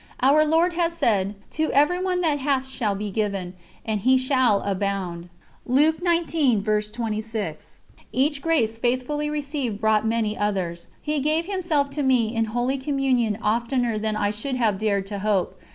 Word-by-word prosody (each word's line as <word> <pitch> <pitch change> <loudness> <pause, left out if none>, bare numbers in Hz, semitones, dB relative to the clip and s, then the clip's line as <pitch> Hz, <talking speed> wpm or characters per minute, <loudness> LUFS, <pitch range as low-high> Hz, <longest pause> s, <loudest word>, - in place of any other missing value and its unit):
Our 285 +4 +5
Lord 325 +3 +2
has 340 -1 0
said: 205 - +1 0.2
"To 315 -1 -1
everyone 360 +6 +2
that 305 -4 +1
hath 270 -1 0
shall 230 -6 -1
be 205 +1 -4
given, 195 -3 -2 0.3
and 220 -2 -1
he 255 +6 +4
shall 255 -5 +2
abound." 190 -3 -3 2.8
Each 280 +2 +1
grace 240 -10 +1
faithfully 255 +5 -1
received 280 -7 -3
brought 220 0 +2
many 220 -2 0
others. 180 -5 -2 0.2
He 300 -1 -1
gave 310 +4 +1
Himself 340 -7 0
to 290 +1 -2
me 245 -4 +2
in 225 0 +1
Holy 245 +5 -1
Communion 260 -6 0
oftener 235 +1 0
than 215 0 -1
I 205 -1 0
should 235 +6 -3
have 220 -6 +1
dared 200 -2 0
to 200 0 -5
hope. 200 -2 -1
245 Hz, 145 wpm, -24 LUFS, 210-290 Hz, 2.8 s, Our